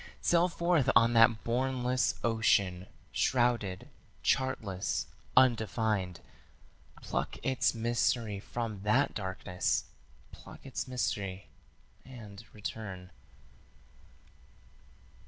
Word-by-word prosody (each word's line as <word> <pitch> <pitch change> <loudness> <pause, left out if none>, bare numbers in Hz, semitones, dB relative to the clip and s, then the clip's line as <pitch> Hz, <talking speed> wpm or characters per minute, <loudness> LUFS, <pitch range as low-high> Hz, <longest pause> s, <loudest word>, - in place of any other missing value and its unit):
Sail 175 +1 +3
forth 170 -6 +1
on 115 0 +5
that 115 -1 +5
bournless 125 +1 0
ocean, 100 -5 +2 0.2
shrouded, 120 -7 +1 0.4
chartless, 105 -8 0 0.3
undefined: 110 -7 +2 0.8
Pluck - - -3
its 130 -2 +1
mystery 115 -2 0
from 110 -1 -5
that 120 +8 +2
darkness; 90 - -1 0.5
pluck - - -13
its 135 +1 -4
mystery 100 -6 -3 0.5
and 115 -5 -11
return. 95 -3 -7
115 Hz, 80 wpm, -31 LUFS, 100-125 Hz, 0.8 s, on